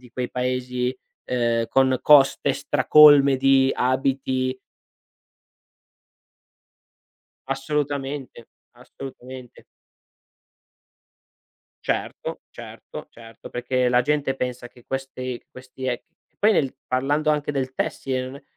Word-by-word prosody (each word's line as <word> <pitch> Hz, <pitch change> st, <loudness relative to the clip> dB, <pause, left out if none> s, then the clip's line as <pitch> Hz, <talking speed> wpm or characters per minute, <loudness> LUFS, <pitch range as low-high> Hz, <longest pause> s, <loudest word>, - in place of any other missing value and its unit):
di 125 Hz, -1 st, -17 dB
quei 125 Hz, +1 st, -4 dB
Paesi, 125 Hz, 0 st, -2 dB, 0.3 s
ehm, 120 Hz, -2 st, 0 dB
con 130 Hz, -1 st, +3 dB
coste 140 Hz, -1 st, +5 dB
stracolme 145 Hz, 0 st, +6 dB
di 135 Hz, 0 st, +4 dB
abiti. 130 Hz, 0 st, -1 dB, 2.9 s
Assolutamente, 135 Hz, -2 st, -3 dB, 0.3 s
assolutamente. 125 Hz, 0 st, -11 dB, 2.2 s
Certo, -, -, -3 dB
certo, -, -, -10 dB
certo, 115 Hz, -1 st, -13 dB
perché 125 Hz, +1 st, 0 dB
la 125 Hz, 0 st, +3 dB
gente 145 Hz, 0 st, 0 dB
pensa 125 Hz, -2 st, -4 dB
che 120 Hz, 0 st, -20 dB
questi- 130 Hz, -2 st, -5 dB
questi 130 Hz, +1 st, -9 dB
ec 125 Hz, -1 st, -2 dB, 0.2 s
che -, -, -47 dB
poi 215 Hz, +2 st, +4 dB
nel 140 Hz, -9 st, 0 dB
parlando 145 Hz, +4 st, 0 dB
anche 150 Hz, -1 st, -1 dB
del 130 Hz, -2 st, -2 dB
tessile, 130 Hz, 0 st, -2 dB
non 130 Hz, -, -8 dB
è 140 Hz, -, -15 dB
130 Hz, 100 wpm, -23 LUFS, 125-135 Hz, 2.9 s, stracolme